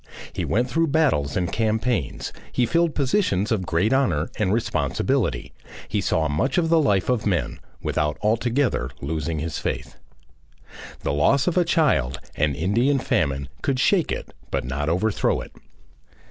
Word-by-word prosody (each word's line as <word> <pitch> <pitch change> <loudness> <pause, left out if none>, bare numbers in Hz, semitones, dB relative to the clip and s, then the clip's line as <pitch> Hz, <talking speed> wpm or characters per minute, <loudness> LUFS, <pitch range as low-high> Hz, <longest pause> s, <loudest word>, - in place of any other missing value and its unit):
He - - -2
went 120 +4 +1
through 165 +5 +1
battles 140 - +1
and 90 -2 -1
campaigns, 110 - -1 0.2
he 125 - +2
filled 170 +3 +1
positions 130 - +1
of 95 -6 0
great 90 +9 +2
honour 85 - +1
and 100 -3 +1
responsibility, 105 - 0 0.4
he - - 0
saw 80 -1 +1
much 85 - 0
of 165 -2 +2
the 165 0 +5
life 100 - +2
of 125 -4 0
men, 90 -4 -1 0.2
without 75 -1 0
altogether 115 - +1
losing 80 +2 -3
his 80 +1 -3
faith. - - -4 1.0
The 70 - -1
loss 130 - +3
of 180 - 0
a 180 - +4
child, 65 - +1 0.2
an 75 -2 +1
Indian 115 - +2
famine, 70 - 0
could 135 -2 0
shake 180 +4 +2
it - - -5 0.2
but - - -2
not 70 +4 -2
overthrow 100 +5 +1
it. - - -8
105 Hz, 155 wpm, -23 LUFS, -, 1.0 s, the